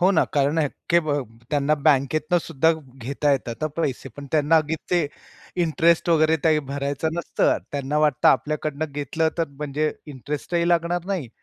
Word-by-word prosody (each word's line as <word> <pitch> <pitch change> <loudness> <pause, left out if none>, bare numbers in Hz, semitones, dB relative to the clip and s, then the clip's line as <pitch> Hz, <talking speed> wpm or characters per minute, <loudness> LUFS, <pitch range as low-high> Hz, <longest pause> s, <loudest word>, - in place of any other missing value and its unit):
हो 185 +2 +5
ना. 185 - +3
कारण 145 +2 +2
अ, 150 - +2 0.2
की 170 - +6
ब 155 -3 -1 0.4
त्यांना 145 0 +2
बँकेतनंसुद्धा 155 +2 +2 0.3
घेता 140 +3 0
येतात 125 0 -3
हा - - +2
पैसे 140 -5 -2
पण 145 0 -8
त्यांना 155 +1 +4 0.3
ते 175 -4 +2 0.6
इंटरेस्ट 170 +1 +2
वगैरे 160 -1 +4
काही 155 -2 +4
भरायचं 140 +2 -2
नसतं. 170 -1 +1
त्यांना 140 +1 -1
वाटतं 150 -4 +3
आपल्याकडनं 150 +1 0
घेतलं 155 +3 -1
तर 165 - 0
म्हणजे 150 +2 -2 0.2
इंटरेस्टही 150 +6 -2
लागणार 170 0 +1
नाही 185 -10 -2
155 Hz, 150 wpm, -23 LUFS, 140-165 Hz, 0.6 s, की